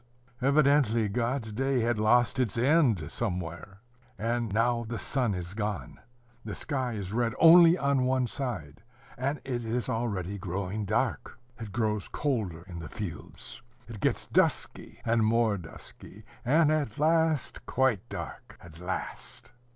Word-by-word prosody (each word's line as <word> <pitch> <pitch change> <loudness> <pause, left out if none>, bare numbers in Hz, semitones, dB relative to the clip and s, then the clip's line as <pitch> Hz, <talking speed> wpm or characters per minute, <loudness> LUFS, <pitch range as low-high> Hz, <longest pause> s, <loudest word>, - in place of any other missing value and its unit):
Evidently, 140 -5 +3
God's 115 +2 -2
day 135 +3 0
had 115 -1 0
lost 120 +4 +3
its 115 -6 0
end 120 - +3
somewhere. 90 -2 -4 0.4
And 115 0 -1
now 115 +2 +1
the 115 - -3
sun 125 -7 -1
is 90 0 -5
gone. 105 -1 -4 0.4
The 105 -2 -5
sky 130 -5 -2
is 100 -2 -5
red 115 -1 0
only 170 +1 +8
on 140 -4 +1
one 130 -1 +2
side, 110 - -5 0.3
and 140 +4 -2
it 125 -3 -3
is 115 0 -2
already 100 -4 -2
growing 95 +3 -3
dark. 110 +4 -1 0.2
It 110 -3 -7
grows 105 -2 -1
colder 105 - -2
in 90 -2 -9
the 80 - -7
fields. 95 -7 -8 0.3
It 115 -3 -8
gets - - 0
dusky - - 0
and 115 -1 +2
more 110 -1 +3
dusky, 95 +3 -11 0.2
and 150 +4 +4
at 145 -8 -1
last 160 -1 +1
quite 130 -6 +1
dark. - - -8
At 85 -1 -14
last! 90 +1 -6
115 Hz, 145 wpm, -29 LUFS, 100-130 Hz, 0.4 s, only